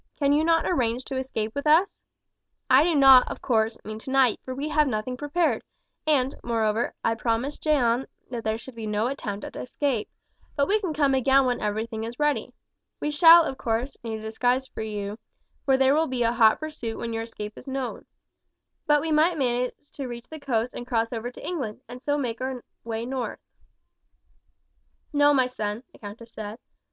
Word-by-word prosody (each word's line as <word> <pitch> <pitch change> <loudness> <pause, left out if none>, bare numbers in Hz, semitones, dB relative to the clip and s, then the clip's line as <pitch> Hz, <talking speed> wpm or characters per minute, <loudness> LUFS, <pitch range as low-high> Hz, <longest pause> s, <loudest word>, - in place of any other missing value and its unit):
Cannot 310 +3 +3
you - - 0
arrange 245 -3 0
to 265 - -4
escape 225 -4 -3
with 280 +2 -3
us? 330 +6 +3 0.7
I 260 +3 +7
do 335 -1 +2
not, 270 -3 +8
of - - -6
course, 225 -2 +1
mean 215 +1 -6
tonight, 265 -1 +2
for 255 - -5
we 280 +3 -3
have 300 -1 +3
nothing 245 +1 -2
prepared, 295 +5 0 0.5
and, 270 -3 +2
moreover, 225 -1 0
I 225 - +3
promised 235 +5 -2
Jeanne 265 -5 +2 0.2
that 235 -2 -4
there 220 0 0
should 255 +3 -11
be 225 -2 -6
no 210 +1 0
attempt 215 -6 -4
at - - -9
escape; 250 -4 -2 0.5
but 280 -1 +2
we 425 +2 +3
can 370 -5 -2
come 285 -2 +3
again 265 +1 +4
when 245 -1 0
everything 220 +2 -2
is 230 +2 -6
ready. 295 -1 0 0.5
We 295 - -1
shall, 330 +2 +8
of 265 -4 -4
course, 235 +4 -1
need 225 -1 -3
a - - -9
disguise 245 +4 0
for - - -8
you, 210 -1 -4 0.5
for 270 -1 +4
there 265 +1 +4
will 320 +2 +2
be 255 -2 -1
a 230 - +3
hot 225 -2 +5
pursuit 300 -8 -5
when 230 -1 -4
your 225 - -2
escape 210 -2 -7
is - - -13
known. 265 -2 -4 0.8
But 295 -1 +4
we 320 +1 -2
might 315 +3 +3
manage 250 -2 0 0.2
to 275 -3 -6
reach 240 0 -8
the 315 - -7
coast 245 -4 -1
and 245 - -7
cross 230 -1 0
over 235 +1 -3
to 245 - -11
England, 260 -11 -4
and 245 +1 -9
so 290 +1 0
make 245 -4 -3
our 260 -1 -3 0.2
way 225 0 -3
north." 255 -1 -3 1.8
"No, 290 0 +5
my 265 -3 +4
son," 220 -2 -4
the - - -17
countess 225 +3 -10
said. 215 0 -6
250 Hz, 195 wpm, -26 LUFS, 225-285 Hz, 1.8 s, not